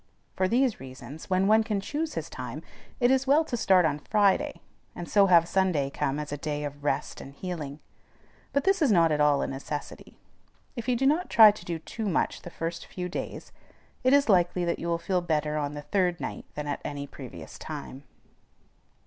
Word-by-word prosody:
For 185 - +1
these 245 +2 +2
reasons, 130 +4 -10
when 185 +1 +2
one 220 +2 +5
can 215 -2 -1
choose 305 +10 -3
his - - -3
time, - - -7 0.4
it 245 0 +4
is 265 0 +2
well 300 +4 +4
to 250 - -3
start 190 -6 +4
on 150 -1 0
Friday, 200 +3 +1 0.4
and 175 - -6
so 200 -1 +4
have 170 -2 +5
Sunday 175 -8 +1
come 135 +1 -1
as 150 -1 -5
a 145 - -3
day 150 0 -3
of 145 0 -6
rest 145 - -2
and 140 - -11
healing; 155 -5 -5 0.7
but 280 - +1
this 390 -1 +2
is 285 -7 +4
not 165 -4 +4
at 150 -1 +1
all 145 -1 +3
a - - -1
necessity. 140 +2 -7 0.6
If 235 -2 -6
you 250 - +3
do 265 +3 0
not 310 +6 +2
try 220 -2 +9
to 205 -4 -12
do 170 -1 -3
too 215 +6 -5
much 170 - 0
the - - -8
first 165 0 -5
few 180 -1 -5
days, - - -6 0.5
it 255 - +4
is 280 0 +5
likely 180 -3 +3
that 170 - -1
you 170 - -4
will 170 0 +1
feel 180 +2 -1
better 155 -3 -1
on 150 -1 -2
the 145 - -6
third 175 +2 0
night - - -5
than 150 - -4
at 145 -1 -3
any 145 -1 -4
previous 135 -3 -10
time. 140 -3 -7
175 Hz, 210 wpm, -27 LUFS, 150-215 Hz, 0.7 s, try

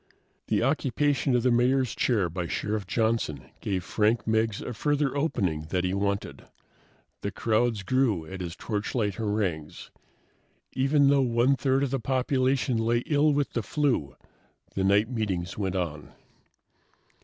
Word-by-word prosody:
The - - +1
occupation 140 0 +1
of 120 - +2
the 125 - +3
Mayor's 125 +1 +2
chair 105 -8 +1
by 85 +1 -4
Sheriff 105 +4 -2
Johnson 110 - -1
gave 95 -3 -2
Frank 110 +4 +1
Meggs 110 -1 +1
a 125 - -5
further 145 +3 0
opening 95 - -1
that 90 0 0
he 90 0 0
wanted. 100 +1 -2 0.7
The - - -2
crowds 115 -1 0
grew 115 -7 +1
at 95 +3 -7
his 85 -1 -5
torchlight 105 0 -2
harangues. 100 -8 -3 0.8
Even 140 +1 +3
though 140 -1 +4
one 125 +2 +3
third 135 0 +1
of 135 - -1
the 135 - 0
population 130 +1 +1
lay 120 +1 +1
ill 150 0 +3
with 145 -1 0
the 120 - 0
flu, 125 - -1 0.6
the 95 - -1
night 100 +3 +4
meetings 100 -7 -2
went 95 -3 -2
on. 80 -5 -3
115 Hz, 145 wpm, -27 LUFS, 95-130 Hz, 0.8 s, though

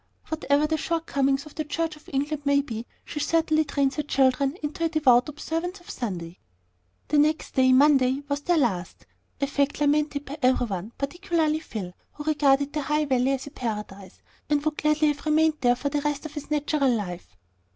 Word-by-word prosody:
Whatever 300 -2 +1
the 315 +1 0
shortcomings 280 -4 0
of 305 - -12
the 310 - -3
Church 320 +1 -2
of 300 - -17
England 290 +2 -2
may 280 0 +3
be, 230 -4 -6 0.2
she 295 - -5
certainly 315 +1 +2
trains 280 -2 0
her - - +1
children 275 +1 +1
into 300 +3 -3
a 330 - +2
devout 275 -5 +4
observance 330 +5 -4
of 350 - -10
Sunday. 180 -7 -5 0.7
The 295 - +3
next 305 +1 +1
day, 260 -1 +4
Monday, 270 0 +4
was 285 0 -1
to 290 - -25
be - - -21
their 350 -1 +4
last, 190 - -1 0.4
a - - +3
fact 280 0 0
lamented 295 0 +1
by 290 +3 -7
every 255 -1 +3
one, 200 0 -5
particularly 315 +1 0
Phil, 200 - -6 0.2
who 295 - -8
regarded 285 -2 +2
the 305 - -1
High 300 +2 0
Valley 260 -1 +2
as 270 - -3
a 285 - -9
paradise, 210 -7 -6 0.3
and 295 0 +1
would 305 -1 -1
gladly 305 0 +3
have 290 -1 -3
remained 310 0 +3
there 245 -1 +4
for 285 +3 -2
the 290 +1 -1
rest 295 0 -2
of 310 - -7
his 295 -1 -7
natural 295 -2 +1
life. 190 -7 -3
290 Hz, 200 wpm, -25 LUFS, 260-305 Hz, 0.7 s, devout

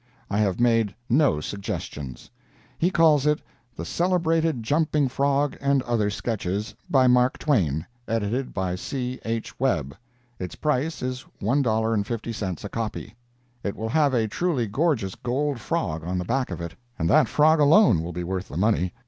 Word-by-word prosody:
I 100 - +1
have 100 -2 +1
made 115 -4 +2 0.2
no 135 - +4
suggestions. 75 -9 -6 0.5
He 175 - +3
calls 155 -5 +4
it 150 0 +3 0.4
"THE 85 - -5
CELEBRATED 165 - +1
JUMPING 150 +2 +1
FROG, 140 +2 +1
AND 140 -1 +2
OTHER 115 -4 +1
SKETCHES, 105 -1 -3 0.2
by 130 -2 +4
'Mark 125 0 +4
Twain.' 85 - +1 0.2
Edited 115 +4 -1
by 95 -2 -2
C. 125 +6 -4
H. 115 0 -4
Webb." 80 - 0 0.4
Its 90 -1 -5
price 150 +1 -1
is 125 0 -3 0.2
$1.50 110 -4 -1
a 105 - -5
copy. 110 0 -4 0.5
It 100 - -3
will 110 +1 -4
have 145 0 +3
a 115 -2 +2
truly 145 - 0
gorgeous 110 - 0
gold 135 +2 -2
frog 90 - -2
on 90 +2 -2
the 90 - -2
back 135 +6 0
of - - -5
it, 85 0 -5 0.2
and 80 - 0
that 130 - +5
frog 155 +6 +4
alone 145 - +6
will 85 +2 -5
be 90 +1 -4
worth 95 +2 -3
the 75 - -7
money. 95 -3 +1
115 Hz, 160 wpm, -25 LUFS, 100-145 Hz, 0.5 s, alone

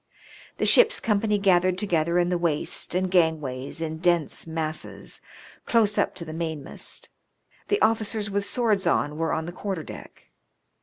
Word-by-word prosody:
The - - 0
ship's 465 -2 +6
company 210 -1 +1
gathered 185 -2 +3
together 170 -4 +1
in 175 0 +2
the 180 - +1
waist 170 0 0
and 185 0 0
gangways 160 -5 0
in 160 -1 -3
dense 170 -3 +1
masses, 160 -1 -4 0.5
close 215 -3 +3
up - - +1
to 175 -3 -7
the 155 - -7
mainmast. 160 -3 -6 0.6
The 410 - +1
officers 220 -1 +1
with 200 0 -1
swords 215 -3 +1
on 150 +1 +1
were 165 0 0
on 160 0 -1
the 175 - -5
quarter 185 -2 -4
deck. - - -12
175 Hz, 155 wpm, -25 LUFS, 160-205 Hz, 0.6 s, ship's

